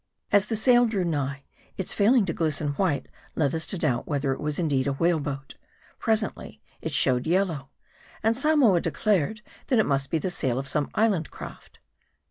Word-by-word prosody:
As 205 0 +4
the 225 - -1
sail 245 +2 +4
drew 205 -4 -1
nigh, 140 -4 -2 0.3
its 190 - 0
failing 220 +2 +4
to 165 - -2
glisten 155 -2 -1
white 145 0 0 0.3
led 145 -4 +1
us 160 0 -2
to 190 - -2
doubt 130 -8 0
whether 140 -2 0
it - - -8
was 150 -1 -2
indeed 145 -6 0
a 140 - +1
whale 165 +3 +2
boat. 140 -1 -6 0.4
Presently, 220 -1 -1 0.2
it 160 - -4
showed 130 -3 +2
yellow; 165 -6 0 0.5
and 225 +1 +3
Samoa 270 - +4
declared, 215 +1 0 0.2
that 255 - +2
it 220 - +4
must 135 -1 0
be 165 - +1
the 180 +4 -2
sail 130 -8 -1
of 135 +1 -3
some 145 +1 0
island 205 -8 +1
craft. - - -11
165 Hz, 185 wpm, -26 LUFS, 140-210 Hz, 0.5 s, As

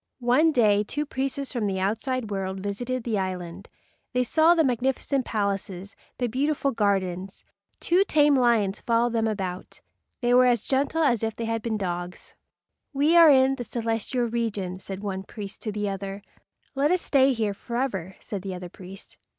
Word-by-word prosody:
One 255 +6 +3
day 210 -6 +3
two 295 +8 -3
priests 275 0 -3
from 230 -5 -1
the 190 -1 -2
outside 225 +4 -2
world 190 -1 -3
visited 235 +6 -3
the 225 -4 -1
island. 185 0 -5 0.4
They 250 0 +2
saw 320 +7 +4
the 325 - +4
magnificent 260 +1 0
palaces, 200 -2 -3 0.2
the 250 - -1
beautiful 275 +4 0
gardens. 195 -3 -1 0.3
Two 360 +3 +3
tame 295 -5 +4
lions 230 -6 +2
followed 235 0 +1
them 225 -1 +1
about. 190 -4 -4 0.4
They 240 0 +2
were 250 0 +6
as 240 -3 +1
gentle 280 +4 +1
as 240 -7 +2
if 225 -1 -2
they 230 - -4
had 225 0 -2
been 220 -1 -2
dogs. 175 -2 -5 0.6
"We 290 +4 +3
are 335 -2 +9
in 265 -1 +5
the 245 - -4
celestial 230 +1 -2
regions," 205 -6 -3
said 195 0 -6
one 190 -2 -3
priest 200 0 -9
to 215 - -3
the 210 0 -2
other. 195 0 -5 0.5
"Let 285 +1 +1
us 365 +1 +1
stay 270 -1 +4
here 220 -4 -1
forever," 200 -5 -3
said 200 -3 -6
the 190 -1 -5
other 180 -1 -7
priest. 190 +2 -13
225 Hz, 175 wpm, -25 LUFS, 195-260 Hz, 0.6 s, are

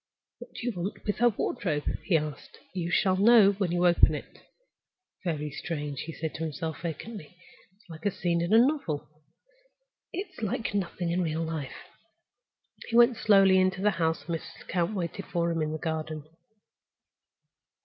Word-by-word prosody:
"What - - -12
do - - -6
you 245 - +1
want 195 +3 -5
with 205 - -1
her 240 +1 +5
wardrobe?" 180 -8 -2 0.2
he 175 - +4
asked. 150 -2 -6 0.2
"You 175 -2 -2
shall 185 +1 +2
know 210 0 +7
when 195 -3 -1
you 175 0 +2
open 175 -1 +5
it." - - -9 0.8
"Very 150 -4 -2
strange!" 145 -3 -4
he 165 - -6
said 160 -1 -4
to 160 - -4
himself, 160 0 -4
vacantly. 175 +1 -7 0.4
"It's 210 - -28
like 160 +2 -5
a - - +1
scene 170 -2 0
in 170 +3 -1
a 220 - +7
novel—it's 310 - -4
like 220 +1 -2
nothing 180 -3 -2
in 180 +2 +1
real 165 -1 -1
life." 160 -4 -5 1.0
He 230 - -3
went 240 +1 +7
slowly 195 -3 +5
into 185 +1 +1
the 210 - +4
house, 160 -2 0
and 165 -1 -1
Mrs. - - -13
Lecount 175 +3 -1
waited 185 +1 -4
for 170 -2 0
him 165 -1 -1
in 155 0 -1
the 155 - -2
garden. 155 -1 -3
175 Hz, 170 wpm, -28 LUFS, 160-205 Hz, 1.0 s, know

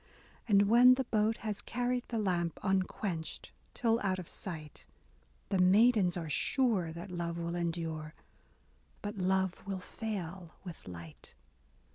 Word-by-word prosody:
And 200 -2 +6
when 240 +4 +7
the 265 - 0
boat 220 -2 +1
has 210 -2 -2
carried 245 +1 -1
the 230 - -3
lamp 175 -5 0
Unquenched, 190 -3 -2 0.2
till 230 -1 +2
out 190 -2 0
of 180 -3 -7
sight. 155 -5 -7 0.6
The 195 - +1
maidens 195 0 +5
are 165 -2 -4
sure 200 - +1
that 170 +4 -8
love 170 -1 -3
will 170 0 -3
endure, 165 -2 -3 0.4
— - - -35
But 205 0 -4
love 190 0 +2
will 195 -1 -2
fail 185 -4 -6
with 175 - -9
light. 85 -3 -10
185 Hz, 140 wpm, -32 LUFS, 170-215 Hz, 0.6 s, when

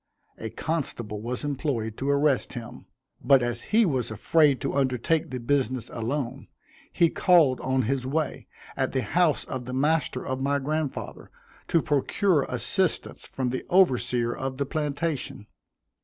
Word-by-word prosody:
A 110 - -4
constable 120 -9 -3
was 125 +4 -4
employed 135 -6 -2
to 135 - -2
arrest 140 -1 +2
him, 120 -3 -8 0.4
but 135 -3 +5
as 120 -1 -2
he 225 +1 +5
was 130 - 0
afraid 140 +6 +3
to - - -2
undertake 135 +3 +1
the 130 - -4
business 130 -1 -1
alone, 125 +2 -3 0.4
he 170 - +4
called 165 -8 +4
on 130 0 +1
his 130 +3 -1
way, 145 +3 -2 0.3
at 130 -1 -1
the 130 -2 0
house 170 +7 +2
of 130 -2 -5
the 125 - -6
master 145 -1 +1
of 130 0 -3
my 140 +1 +1
grandfather, 150 +1 -3 0.4
to 165 - +2
procure 150 +3 +2
assistance 155 - -1
from 130 -2 -2
the 130 - -3
overseer 125 -9 +3
of 130 0 -4
the 140 - 0
plantation. 145 -5 -3
135 Hz, 150 wpm, -26 LUFS, 125-150 Hz, 0.4 s, but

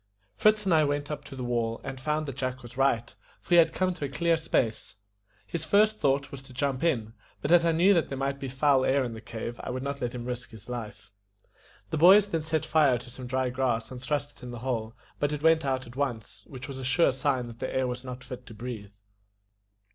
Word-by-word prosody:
Fritz 215 - +3
and 185 - +3
I 155 -1 +5
went 145 0 -1
up 145 -1 -4
to 135 - -9
the 130 - -5
wall 115 -2 -1
and 135 -1 -6
found 155 +2 0
that 135 -3 -6
Jack 130 -1 -3
was 120 +1 -11
right, 125 -3 +1 0.3
for - - -23
he 175 - +7
had 170 - +6
come 185 -1 0
to 160 -5 -4
a - - -4
clear 170 +4 +2
space. 120 -8 -1 0.5
His 170 -2 -3
first 215 +6 +3
thought 140 0 +1
was 140 - -7
to 135 -1 -15
jump 135 +1 -1
in; 115 -10 0 0.3
but 145 - -2
as 170 -1 +6
I - - +4
knew 175 +5 +5
that 170 -4 +1
there 135 - -4
might 140 +1 -2
be 135 -1 -4
foul 135 0 +3
air 135 +1 +3
in 120 -2 -4
the 110 - -8
cave, 115 +1 -6
I - - -5
would 130 +1 -3
not 140 0 -4
let 125 0 -2
him 120 -1 -5
risk 125 0 -5
his 110 -2 -13
life. 110 -5 -7 0.8
The 160 - 0
boys 195 +5 +8
then 165 -3 0
set 155 -1 -1
fire 145 -6 +4
to 120 +1 -10
some 125 0 -8
dry 130 0 0
grass, 125 -3 -1
and 125 -1 -7
thrust 145 +2 -2
it - - -19
in 125 - -7
the 120 -1 -7
hole, 115 -3 -2 0.2
but 145 0 +1
it 150 0 -4
went 160 -1 +4
out 130 -1 -1
at 120 - -13
once, 125 -6 -4
which 130 -1 -8
was 135 -2 -6
a - - -6
sure 135 +6 +3
sign 130 -1 0
that 115 -1 -10
the - - -3
air 130 - +1
was 125 0 -4
not 125 -1 -7
fit 125 -1 -9
to 115 - -10
breathe. 110 -3 -7
135 Hz, 255 wpm, -28 LUFS, 125-150 Hz, 0.8 s, boys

